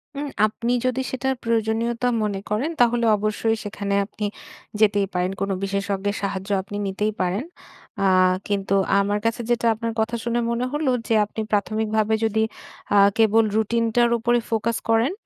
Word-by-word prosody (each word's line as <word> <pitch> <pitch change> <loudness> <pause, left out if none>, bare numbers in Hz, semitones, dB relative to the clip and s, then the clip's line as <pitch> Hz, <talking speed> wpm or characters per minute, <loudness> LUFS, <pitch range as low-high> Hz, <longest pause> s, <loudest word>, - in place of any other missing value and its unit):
উম 290 +1 -3 0.2
আপনি 230 +3 -2
যদি 255 +1 0
সেটার 265 +1 -1
প্রয়োজনীয়তা 230 +1 0 0.2
মনে 205 -2 -2
করেন, 220 +9 0
তাহলে 240 0 +3
অবশ্যই 215 +2 0
সেখানে 200 -1 -4
আপনি 210 +1 -5 0.5
যেতেই 205 -2 +3
পারেন। 180 +1 0
কোনো 195 0 0
বিশেষজ্ঞের 200 +1 -1
সাহায্য 195 -1 -3
আপনি 200 +2 -7
নিতেই 210 +3 -1
পারেন। 185 +6 0 0.6
আ - - +2 0.4
কিন্তু 195 -1 0 0.2
আমার 205 +1 +1
কাছে 230 +1 0
যেটা 240 -1 +1
আপনার 230 +1 -4
কথা 220 +2 0
শুনে 235 0 0
মনে 235 +1 -1
হলো 295 -3 +1 0.2
যে - - +1
আপনি 215 +2 -5
প্রাথমিকভাবে 215 +1 0
যদি 220 0 +1 0.5
আ - - +6 0.2
কেবল 225 0 +4
রুটিনটার 230 +2 +2
উপরে 240 +1 +2
ফোকাস 230 0 0
করেন। 225 +5 +3
220 Hz, 155 wpm, -23 LUFS, 205-235 Hz, 0.6 s, আ